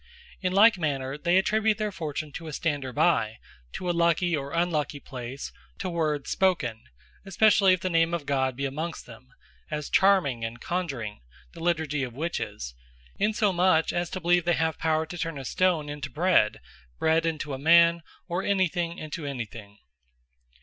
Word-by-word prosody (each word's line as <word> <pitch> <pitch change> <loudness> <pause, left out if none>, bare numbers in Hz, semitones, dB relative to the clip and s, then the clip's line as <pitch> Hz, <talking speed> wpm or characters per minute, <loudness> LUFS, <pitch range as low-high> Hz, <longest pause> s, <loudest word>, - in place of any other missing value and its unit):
In 185 -2 0
like 205 +1 +6
manner 135 -4 -2
they 175 +4 +2
attribute 215 +2 +2
their 215 -1 -2
fortune 155 -4 -5
to 165 +3 -8
a 155 - -6
stander 145 -4 -2
by, 145 -8 +2 0.4
to 180 - -5
a - - +2
lucky 170 0 +2
or 140 -1 -4
unlucky 155 -4 -1
place, 130 0 -7 0.3
to 185 - -4
words 155 -4 -1
spoken, 150 - +1 0.4
especially 195 -1 +4
if 185 - -1
the 185 - -1
name 165 0 +3
of 160 -4 -5
God 130 -2 0
be 140 +2 -3
amongst 155 +5 -4
them; 125 +2 -14 0.4
as 150 -1 -4
Charming, 180 -12 +3
and 115 +1 -5
Conjuring 135 -13 -3 0.3
(the 170 - -11
Leiturgy 160 -4 0
of 125 -3 -4
Witches;) 140 - -4 0.5
insomuch 190 -6 +2
as 175 -1 -1
to 185 - -4
believe, 175 0 +3
they 175 +1 +2
have 160 -1 0
power 160 0 +1
to 175 +2 -8
turn 165 -2 -3
a 135 - -7
stone 175 -1 +1
into 145 -1 -5
bread, 175 +8 +2 0.4
bread 160 +1 +2
into 155 -3 -3
a 130 - -5
man, 170 +3 +5 0.3
or 175 +1 -1
any 195 -2 +2
thing, 170 0 -3
into 155 -1 -6
any 130 -4 -3
thing. 105 -2 -12
160 Hz, 175 wpm, -27 LUFS, 140-175 Hz, 0.5 s, like